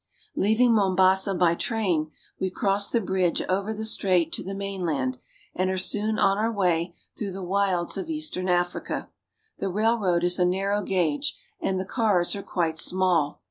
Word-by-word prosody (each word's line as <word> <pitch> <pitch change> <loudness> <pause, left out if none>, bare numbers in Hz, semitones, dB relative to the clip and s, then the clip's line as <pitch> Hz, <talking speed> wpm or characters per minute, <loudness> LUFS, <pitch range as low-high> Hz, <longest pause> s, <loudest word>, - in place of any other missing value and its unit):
Leaving 225 +4 +3
Mombasa 190 -1 +3
by 175 -1 +3
train, 175 -6 -1 0.3
we 190 - 0
cross 200 +2 +1
the 235 - +2
bridge 185 -4 0
over 195 +3 -1
the 220 0 -4
strait 180 -6 +1
to - - -1
the 195 +1 -5
mainland, 170 -10 -2 0.3
and 185 0 0
are 190 - -1
soon 210 +3 0
on 195 +1 +3
our 225 +2 +1
way 175 -4 0 0.2
through 200 -3 -4
the 190 0 -6
wilds 185 -1 0
of 340 - -5
eastern 305 - -3
Africa. 175 0 -1 0.5
The 195 - -1
railroad 205 -3 +1
is 180 +1 +2
a - - +4
narrow 195 +3 0
gauge, 175 -7 -1 0.2
and 190 -1 -1
the 190 - -3
cars 205 -6 +1
are 200 - -4
quite 165 -4 -2
small. 180 -5 +1
190 Hz, 170 wpm, -25 LUFS, 175-205 Hz, 0.5 s, a